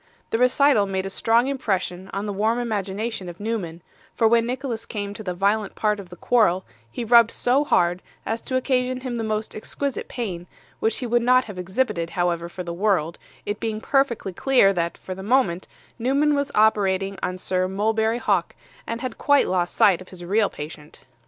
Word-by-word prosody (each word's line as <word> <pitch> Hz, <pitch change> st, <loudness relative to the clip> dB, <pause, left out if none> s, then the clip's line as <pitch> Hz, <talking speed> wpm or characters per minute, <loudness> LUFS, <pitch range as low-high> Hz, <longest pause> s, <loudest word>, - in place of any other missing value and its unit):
The 225 Hz, -, +1 dB
recital 250 Hz, -4 st, +4 dB
made 190 Hz, -1 st, -2 dB
a 195 Hz, -, -4 dB
strong 230 Hz, +4 st, +2 dB
impression 190 Hz, -8 st, -2 dB
on 200 Hz, +2 st, -3 dB
the 205 Hz, -, -3 dB
warm 215 Hz, +4 st, +1 dB
imagination 210 Hz, -3 st, -3 dB
of 175 Hz, -, -10 dB
Newman; 195 Hz, -7 st, -4 dB, 0.3 s
for 225 Hz, -, +4 dB
when 230 Hz, +1 st, +3 dB
Nicholas 250 Hz, -2 st, -4 dB
came 205 Hz, -2 st, -4 dB
to 210 Hz, -, -8 dB
the 180 Hz, -4 st, -4 dB
violent 200 Hz, +2 st, 0 dB
part 210 Hz, -1 st, 0 dB
of 190 Hz, -3 st, -10 dB
the 180 Hz, -, -10 dB
quarrel, 190 Hz, -3 st, +2 dB, 0.3 s
he 240 Hz, -, -4 dB
rubbed 235 Hz, 0 st, +6 dB
so 255 Hz, +5 st, +2 dB
hard, 175 Hz, -9 st, +2 dB, 0.2 s
as 225 Hz, +1 st, -2 dB
to 260 Hz, -, -4 dB
occasion 255 Hz, 0 st, 0 dB
him 250 Hz, -2 st, -4 dB
the 225 Hz, -, -2 dB
most 215 Hz, 0 st, -3 dB
exquisite 275 Hz, +5 st, -4 dB
pain, 180 Hz, -8 st, -5 dB, 0.3 s
which 220 Hz, 0 st, +1 dB
he 255 Hz, -, -4 dB
would 240 Hz, 0 st, +2 dB
not 255 Hz, +1 st, +4 dB
have 205 Hz, -4 st, -8 dB
exhibited, 180 Hz, -2 st, -1 dB
however, 170 Hz, -1 st, 0 dB
for 180 Hz, +1 st, -6 dB
the 170 Hz, -1 st, -5 dB
world, 175 Hz, -4 st, 0 dB, 0.3 s
it 205 Hz, 0 st, -3 dB
being 220 Hz, -1 st, -2 dB
perfectly 235 Hz, -6 st, 0 dB
clear 245 Hz, -2 st, +4 dB
that, 170 Hz, -2 st, -2 dB
for 185 Hz, -, -7 dB
the 190 Hz, -, -8 dB
moment, 195 Hz, -5 st, +1 dB, 0.3 s
Newman 280 Hz, +5 st, +2 dB
was 285 Hz, 0 st, -1 dB
operating 195 Hz, -2 st, +2 dB
on 185 Hz, -, -2 dB
Sir 185 Hz, 0 st, -1 dB
Mulberry 220 Hz, +4 st, 0 dB
Hawk, 200 Hz, -7 st, 0 dB, 0.3 s
and 230 Hz, +1 st, -4 dB
had 255 Hz, -3 st, -5 dB
quite 285 Hz, -1 st, +4 dB
lost 180 Hz, -1 st, 0 dB
sight 185 Hz, -3 st, +4 dB
of 185 Hz, -, -12 dB
his 175 Hz, -2 st, -10 dB
real 205 Hz, +3 st, +2 dB
patient. 150 Hz, 0 st, -9 dB
210 Hz, 195 wpm, -23 LUFS, 185-240 Hz, 0.3 s, rubbed